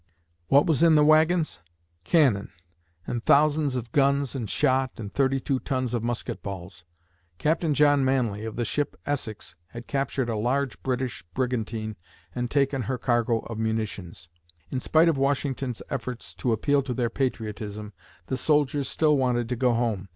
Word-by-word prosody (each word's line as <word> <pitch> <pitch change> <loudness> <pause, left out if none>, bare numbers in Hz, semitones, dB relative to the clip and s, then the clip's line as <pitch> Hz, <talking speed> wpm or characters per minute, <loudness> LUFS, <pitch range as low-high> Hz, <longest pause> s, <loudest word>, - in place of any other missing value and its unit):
What 140 +1 +5
was 160 -2 +1
in 165 -2 +6
the 150 -1 +5
wagons? 155 - +3 0.5
Cannon! 130 - +3 0.5
and 120 -1 -3
thousands 150 -1 +3
of 120 -2 -4
guns 140 -1 +2
and 120 -7 -4
shot 130 +3 +1
and 105 -2 -7
thirty 135 -1 +2
two 135 0 -1
tons 130 -3 -2
of 120 - 0
musket 120 -2 -3
balls! 90 -4 -8 0.5
Captain 155 - +1
John 145 -1 +4
Manly, 120 -6 0
of 110 -1 -5
the 120 - -1
ship 145 +4 -2
Essex, 110 -9 -4
had 120 +6 -9
captured 135 -2 -1
a 115 - -1
large 130 +5 -1
British 130 -1 -2
brigantine 115 -4 -2 0.4
and 125 -1 -2
taken 135 -1 +1
her 125 +3 -2
cargo 120 -2 +1
of 115 -1 -7
munitions. 110 -7 -3 0.4
In 130 - -1
spite 160 +5 +3
of 160 -5 +2
Washington's 135 -3 -1
efforts 125 -2 -5
to 125 - -1
appeal 140 +6 +2
to 130 -2 -4
their 120 -1 0
patriotism, 105 -5 -4 0.3
the 130 - -2
soldiers 145 0 +1
still 155 -2 +3
wanted 125 -3 +1
to 125 - -1
go 125 +1 +2
home. 115 -5 -1
125 Hz, 165 wpm, -26 LUFS, 115-140 Hz, 0.5 s, in